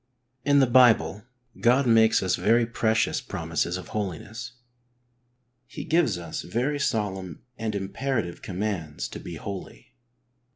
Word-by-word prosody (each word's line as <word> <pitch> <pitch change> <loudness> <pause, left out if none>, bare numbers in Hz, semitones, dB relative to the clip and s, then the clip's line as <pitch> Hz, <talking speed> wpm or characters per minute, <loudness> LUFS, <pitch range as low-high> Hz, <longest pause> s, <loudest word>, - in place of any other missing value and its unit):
In 145 0 +4
the 135 - +6
Bible 110 -6 +4 0.3
God 125 +3 +4
makes 115 -3 +4
us 95 - +2
very 115 +2 +3
precious 110 -1 +1
promises 90 - -2
of 90 - -9
holi 100 -6 -2
ness. 120 +6 -9 1.1
He - - -7
gives 165 - +2
us 85 -2 -5
very 130 +9 -1
solemn 100 - -2
and 110 -3 -3
imperative 100 -1 -2
commands 95 -6 -3
to - - -7
be - - -8
holy. 100 -2 -8
110 Hz, 130 wpm, -26 LUFS, 95-120 Hz, 1.1 s, the